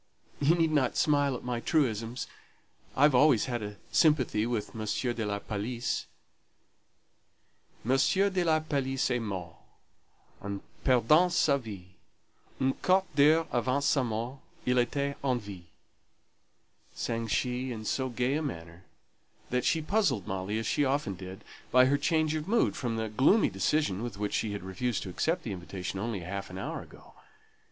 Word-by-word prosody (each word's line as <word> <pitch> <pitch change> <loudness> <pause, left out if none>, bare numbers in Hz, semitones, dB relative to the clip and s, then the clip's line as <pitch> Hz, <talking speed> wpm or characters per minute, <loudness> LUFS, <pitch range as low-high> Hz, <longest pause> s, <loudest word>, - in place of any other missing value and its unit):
You 150 +4 +4
need 165 -2 +2
not 140 -5 +1
smile 145 -3 +2
at - - -7
my 125 -1 -2
truisms; 120 -4 0 0.7
I've 145 +1 +5
always 130 -3 +5
had 120 -3 -3
a 105 0 -6 0.2
sympathy 130 -9 +3
with 115 -3 -3
M. 110 - -4 0.3
de 115 - -3
la 100 0 -1
Palisse, 110 +4 -3 1.8
M. 125 - 0 0.4
de 185 -2 +1
la 160 -2 +3
Palisse 135 -4 -1
est 125 - +1
mort 90 -6 -5 0.9
En 100 0 -4 0.2
perdant 145 +8 +4
sa 145 -4 +3
vie; 105 -7 -8 0.7
Un 130 0 +2
quart 190 +1 +3
d'heure 155 +3 +5
avant 130 +3 +1
sa 145 -1 +3
mort 120 +3 -3 0.3
Il 125 0 +2
Ätait 140 +3 +1
en 130 -3 +2
vie," 100 -5 -10 1.3
sang 115 0 -2
she, 125 +3 -1
in 110 -2 -6
so 130 +4 -1
gay 125 +2 0
a 155 - 0
manner 85 - -7 0.7
that 125 0 +1
she 160 -2 +2
puzzled 195 - +1
Molly, 95 +3 -3
as 110 - -2
she 145 - +1
often 140 -6 0
did, 95 +2 -9 0.3
by 125 0 +6
her 140 +2 +3
change 155 0 +1
of 155 +1 -3
mood 230 +3 +2
from 120 -4 -2
the 110 0 -1
gloomy 130 - +3
decision 95 - 0
with 115 -4 -5
which 105 0 -2
she 105 -2 -1
had 100 - -5
refused 100 +5 -2
to 95 - -6
accept 165 - 0
the 110 - -4
invitation 90 +1 -5
only 105 -2 -3
half 100 +3 -5
an 90 - -8
hour 95 - -4
ago. - - -16
125 Hz, 160 wpm, -29 LUFS, 105-145 Hz, 1.8 s, by